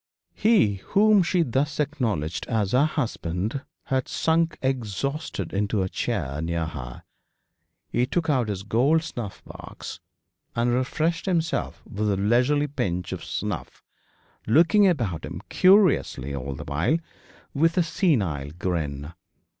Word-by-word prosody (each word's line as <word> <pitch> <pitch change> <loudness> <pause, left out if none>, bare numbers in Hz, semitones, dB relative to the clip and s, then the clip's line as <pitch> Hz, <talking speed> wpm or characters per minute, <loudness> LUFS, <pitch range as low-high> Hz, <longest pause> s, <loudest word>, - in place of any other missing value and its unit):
He, 205 - +3
whom 205 - +4
she 175 0 +2
thus 140 +3 -1
acknowledged 115 - -1
as 105 -4 0
her 135 +5 +4
husband, 110 - -2 0.2
had 130 -1 -1
sunk 165 0 +1
exhausted 130 - -2
into 100 0 0
a 95 - -2
chair 70 -3 -2
near 85 0 -1
her. 70 -6 -7 0.8
He 125 - 0
took 170 +3 -1
out 130 -7 +2
his 100 -2 -3
gold 135 +10 +2
snuff 120 - -7
box, - - -9 0.6
and 120 +1 +2
refreshed 160 +8 0
himself 170 -3 -1
with 105 +1 -2
a 100 - +1
leisurely 125 +8 +3
pinch 90 - -2
of - - -5
snuff, - - -4 0.6
looking 170 - +5
about 115 - 0
him - - -6
curiously 185 - +4
all 70 0 -4
the - - -7
while, 80 - +1 0.6
with 165 +5 +2
a 180 - +5
senile 100 - 0
grin. 80 -4 -3
120 Hz, 130 wpm, -25 LUFS, -, 0.8 s, looking